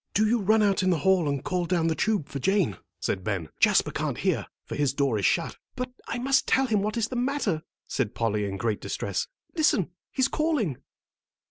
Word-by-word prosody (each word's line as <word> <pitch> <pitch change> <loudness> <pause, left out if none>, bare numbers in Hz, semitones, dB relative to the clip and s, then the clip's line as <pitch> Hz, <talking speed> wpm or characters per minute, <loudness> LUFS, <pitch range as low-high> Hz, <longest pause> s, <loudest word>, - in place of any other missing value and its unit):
"Do 215 - +4
you 235 +2 +3
run 215 +2 +4
out 200 -2 +3
in 185 - +2
the 175 - +3
hall 175 0 +3
and 140 -2 -2
call 180 -1 -1
down 170 -1 +1
the 165 - +2
tube 205 -3 0
for 140 - -5
Jane," 190 - +1 0.2
said 95 - -2
Ben. 95 -7 -2
"Jasper - - +4
can't - - -2
hear, - - 0 0.2
for - - -7
his 140 -2 0
door 135 -7 +1
is 100 - +3
shut." - - 0 0.2
"But 250 0 -3 0.2
I - - -2
must 270 +2 +2
tell 270 - +3
him 215 -5 +1
what 210 +3 -2
is 225 -1 0
the 255 - -5
matter," 245 - 0 0.3
said 125 -6 -2
Polly, 105 -3 0
in 100 -1 -3
great 105 +1 -1
distress. - - -2 0.3
"Listen, 240 - +2 0.2
he's 260 0 +2
calling." 275 - 0
185 Hz, 215 wpm, -27 LUFS, 140-230 Hz, 0.3 s, Do